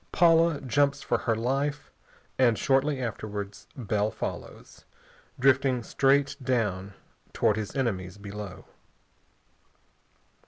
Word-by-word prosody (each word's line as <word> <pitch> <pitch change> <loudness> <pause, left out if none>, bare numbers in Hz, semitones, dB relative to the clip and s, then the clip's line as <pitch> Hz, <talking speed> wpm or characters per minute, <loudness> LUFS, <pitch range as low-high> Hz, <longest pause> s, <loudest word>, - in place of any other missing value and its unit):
Paula 165 -2 +4
jumps 140 +2 +1
for - - 0
her 115 - 0
life, 135 +5 -2 0.5
and 120 -4 +4
shortly 135 +1 +2
afterwards 105 -4 -5
Bell 105 -3 0
follows, - - -7 0.5
drifting 130 -2 +3
straight 140 +3 +2
down 105 -7 -1 0.4
towards 105 0 +2
his 105 - -5
enemies 95 -8 -2
below. 100 -1 -8
125 Hz, 95 wpm, -27 LUFS, 105-140 Hz, 0.5 s, Paula